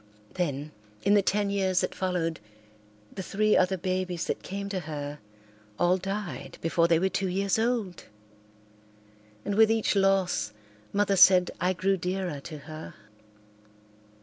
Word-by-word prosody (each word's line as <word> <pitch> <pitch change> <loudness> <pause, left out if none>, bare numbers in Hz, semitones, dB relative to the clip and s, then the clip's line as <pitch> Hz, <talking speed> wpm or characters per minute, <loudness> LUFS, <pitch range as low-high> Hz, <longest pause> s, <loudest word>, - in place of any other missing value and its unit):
Then, 150 -4 -2 0.3
in 205 - +4
the 205 - +6
ten 200 +1 0
years 190 -2 +1
that - - -2
followed, 180 -3 -2 0.7
the - - -5
three 215 +3 +1
other 185 +1 +3
babies 185 -1 -2
that - - -3
came 200 +1 -5
to 195 -2 -2
her 150 -3 -6 0.6
all 175 +1 +3
died 195 0 -5
before 165 +1 +2
they 170 -1 +4
were 185 +4 +2
two 190 +1 -1
years 195 +3 0
old. 225 -6 -1 1.4
And 205 - -1
with 220 +1 +5
each 225 -1 +1
loss 190 - +2 0.4
Mother 200 -1 +2
said 185 -1 +6
I 180 +1 +2
grew 190 +2 +1
dearer 180 -4 -3
to 155 +2 -8
her. 155 0 -9
185 Hz, 145 wpm, -28 LUFS, 170-200 Hz, 1.4 s, the